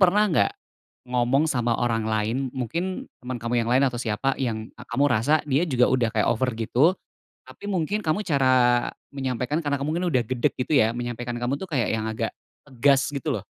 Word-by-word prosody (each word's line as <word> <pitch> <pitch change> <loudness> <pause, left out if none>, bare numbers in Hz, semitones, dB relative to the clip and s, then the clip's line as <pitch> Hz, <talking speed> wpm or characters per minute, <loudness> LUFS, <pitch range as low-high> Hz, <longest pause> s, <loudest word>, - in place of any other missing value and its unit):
pernah 190 +2 +5
nggak 160 - +3 0.6
ngomong 125 +4 +2
sama 120 -6 0
orang 115 -2 0
lain, 110 +2 0 0.2
mungkin 170 +10 -3 0.2
teman 125 0 -5
kamu 120 +1 -1
yang - - -4
lain 130 +3 +4
atau 125 -3 -1
siapa, 120 +4 0
yang 110 -3 -3
kamu 140 - -1
rasa 145 +8 +2
dia 150 +4 +1
juga 125 -4 +3
udah 125 -3 +2
kayak 105 -2 +2
over 125 +3 0
gitu, 130 - +2 0.5
tapi - - -11
mungkin 195 +2 -1
kamu 160 +7 0
cara, 130 -4 +3 0.3
menyampaikan 135 +2 -2
karena 145 -1 0
kamu 140 - -3
mungkin 180 +1 -1
udah 130 -6 +2
gedek 125 -2 0
gitu 130 +5 -1
ya, 110 +1 +3
menyampaikan 120 0 -4
kamu 120 +3 -1
tuh 190 - -6
kayak 130 -6 0
yang 110 -1 -1
agak, 110 0 -3 0.3
tegas 135 +1 +2
gitu 140 -3 -3
loh. - - -7
125 Hz, 190 wpm, -25 LUFS, 120-145 Hz, 0.6 s, pernah